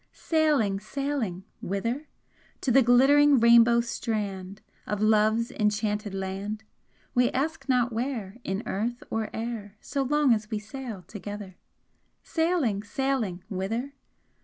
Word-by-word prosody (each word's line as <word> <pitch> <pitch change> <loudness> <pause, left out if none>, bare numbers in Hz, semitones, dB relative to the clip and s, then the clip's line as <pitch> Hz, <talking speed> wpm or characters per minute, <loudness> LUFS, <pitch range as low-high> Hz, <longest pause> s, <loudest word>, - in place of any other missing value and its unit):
Sailing, 295 - +1
sailing! 230 -5 -3 0.2
Whither? 230 - -2 0.5
To 260 - +1
the 270 +3 +6
glittering 270 +3 +6
rainbow 235 0 +6
strand 205 -4 -4 0.2
Of 210 - -2
Love's 220 +2 +3
enchanted 210 -1 -1
land? 195 +3 -4 0.5
We 245 0 +4
ask 290 +1 -2
not 250 -2 +2
where 230 -4 -3
In 195 +3 -3
earth 235 +5 -2
or 225 -1 -1
air, 220 -3 -5
So 280 - -3
long 285 -1 +3
as 215 -1 -2
we 215 - -1
sail 220 -2 -7
together! 205 0 -8 0.7
Sailing, 320 - +1
sailing! 220 -5 -2
Whither? 225 +8 -3
225 Hz, 120 wpm, -27 LUFS, 205-260 Hz, 0.7 s, the